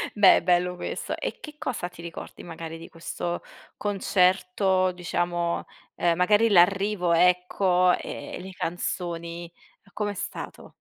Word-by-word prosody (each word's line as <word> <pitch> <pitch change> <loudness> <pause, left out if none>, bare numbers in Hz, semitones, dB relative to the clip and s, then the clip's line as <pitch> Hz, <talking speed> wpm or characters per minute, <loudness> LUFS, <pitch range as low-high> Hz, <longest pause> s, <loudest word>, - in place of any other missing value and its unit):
Beh, 205 -2 +7
bello 180 0 +2
questo. 175 - -4
E - - -4
che 300 -1 -9
cosa 235 -11 -3
ti 180 -1 -13
ricordi 170 -1 -8
magari 165 -1 -7
di 165 - -10
questo 170 +1 -4 0.3
concerto, 185 -1 +2
diciamo, 175 -1 -1 0.3
ehm, 170 -1 +2
magari, 210 +5 +4
l'arrivo, 195 -1 +4
ecco, 180 +1 +3
ehm, - - -7
le 190 +1 -8
canzoni, 170 -1 -4 0.4
com'è 205 -1 -2
stato? 195 - -7
180 Hz, 120 wpm, -26 LUFS, 175-190 Hz, 0.4 s, Beh